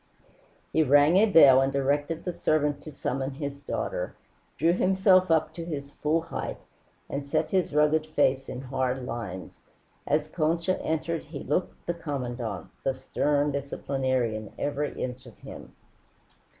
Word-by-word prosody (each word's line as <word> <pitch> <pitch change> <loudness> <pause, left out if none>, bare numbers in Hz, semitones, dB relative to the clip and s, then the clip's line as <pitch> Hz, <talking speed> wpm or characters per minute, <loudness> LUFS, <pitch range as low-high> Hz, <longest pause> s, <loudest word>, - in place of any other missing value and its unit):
He 160 - +4
rang 145 +3 +5
a 215 +3 +6
bell 140 -9 +8
and 135 0 +1
directed 145 +4 0
the 180 - -2
servant 150 -3 +1
to 155 - -9
summon 135 -1 -3
his 140 -1 -5
daughter, - - -3 0.4
drew 165 +1 +3
himself 185 0 +4
up 160 -1 +2
to 170 - -6
his 145 -4 -5
full 155 +3 0
height, 165 - -5 0.5
and 140 0 -4
set - - 0
his 185 -2 +1
rugged 150 +1 +3
face 135 -3 +1
in 125 - -5
hard 130 -1 -2
lines. 105 -7 -6 0.5
As 150 +1 +1
Concha 170 +3 0
entered 160 +1 -2
he 150 -2 -7
looked 165 +6 -2
the 175 - -1
Commandante, 125 - -5
the 135 - 0
stern 145 +2 0
disciplinarian, 130 -5 -2
every 145 0 -2
inch 125 0 -5
of - - -14
him. - - -11
145 Hz, 150 wpm, -27 LUFS, 135-160 Hz, 0.5 s, bell